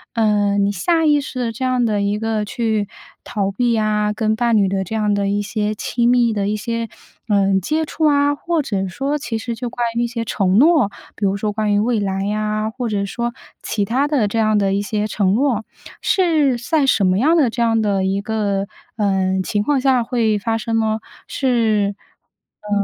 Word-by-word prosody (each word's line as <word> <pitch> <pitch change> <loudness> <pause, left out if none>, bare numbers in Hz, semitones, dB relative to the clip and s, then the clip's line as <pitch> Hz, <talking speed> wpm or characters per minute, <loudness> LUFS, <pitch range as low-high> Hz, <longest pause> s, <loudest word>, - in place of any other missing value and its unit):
呃， 205 -2 +2
你 200 0 +2
下 325 - +1
意 295 -1 +4
识 260 -2 -6
地 235 -2 -1
这 260 - -5
样 255 -2 +1
地 210 -2 0
一 205 +1 0
个 225 -1 -1
去 215 -1 -1 0.3
逃 195 -2 -2
避 240 +2 +1
啊， 210 -1 +1
跟 215 0 0
伴 235 -1 +2
侣 200 -2 +3
的 190 0 -1
这 205 - -8
样 210 -1 +1
的 200 -1 0
一 205 +1 0
些 210 0 -2
亲 235 +3 0
密 240 -2 +3
的 200 -1 -1
一 215 - 0
些， 230 +1 -3 0.4
呃， 195 -1 +3
接 310 - -1
触 315 +1 -2
啊， 285 -1 +3
或 335 +1 -1
者 195 -6 -2
说 275 +10 -2
其 235 -4 -3
实 235 +1 -4
就 245 0 -4
关 240 0 -2
于 235 - +1
一 - - 0
些 230 -1 -4
承 195 -2 +1
诺， 295 -6 +5 0.3
比 210 - -8
如 195 +1 +1
说 210 +1 -2
关 215 -1 0
于 205 - +3
未 230 0 +1
来 195 0 -2
啊， 215 0 -1
或 240 -1 -4
者 200 -1 -1
说 235 +4 -3 0.3
其 205 -2 -1
他 265 +7 +1
的 265 -9 +1
这 225 +3 -2
样 215 -1 +2
的 195 -1 +1
一 200 - 0
些 210 +1 -2
承 200 -1 +1
诺， 245 -4 +1 0.4
是 310 -9 +2
在 280 +4 +1
什 200 -6 +3
么 185 +2 +2
样 320 +6 +3
的 270 -7 +3
这 235 - -3
样 225 -1 +2
的 200 -2 0
一 195 +1 0
个， 200 -2 -1 0.3
呃， 190 -2 +1
情 205 +2 -1
况 280 +2 +1
下 255 -2 +2
会 230 -3 +1
发 225 +1 -1
生 225 +1 -1
呢？ 220 0 0 0.3
是， 220 -6 +1 0.7
呃， 210 - -10
220 Hz, 230 characters per minute, -19 LUFS, 205-245 Hz, 0.7 s, 诺